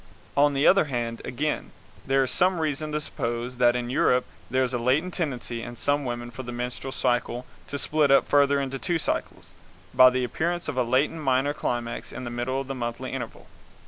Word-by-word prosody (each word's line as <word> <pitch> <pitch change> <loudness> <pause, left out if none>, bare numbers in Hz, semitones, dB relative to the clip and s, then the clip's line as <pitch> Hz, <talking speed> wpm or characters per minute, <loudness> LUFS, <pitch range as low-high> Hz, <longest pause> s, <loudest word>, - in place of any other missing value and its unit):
On 145 0 +4
the 140 - +2
other 195 -3 +6
hand, 120 -4 -3
again, 150 +4 -2 0.4
there 135 0 +3
is 130 - -1
some 185 -1 +3
reason 155 -1 -2
to 150 - 0
suppose 120 -3 -4
that 120 -1 +4
in 120 0 -2
Europe 125 -1 +3 0.2
there 130 +1 +2
is 130 0 -2
a 120 - 0
latent 140 +9 +1
tendency 125 -7 -3
in 120 +1 -7
some 145 +3 0
women 120 -1 -4
for 130 - -7
the 120 -1 -7
menstrual 125 +2 -4
cycle 125 -1 0 0.2
to 140 - -4
split 150 0 +2
up 135 - +5
further 140 0 +4
into 135 -1 -3
two 170 +4 0
cycles, 160 - -3 0.4
by 130 0 +8
the 130 0 -1
appearance 170 +7 -2
of - - -3
a 130 - +2
latent 130 +6 +1
minor 135 +1 +2
climax 120 -4 -3
in 130 - -7
the 120 - -5
middle 120 +2 -2
of 135 - -5
the 135 - -3
monthly 120 -2 -4
interval. - - -6
130 Hz, 210 wpm, -26 LUFS, 120-145 Hz, 0.4 s, by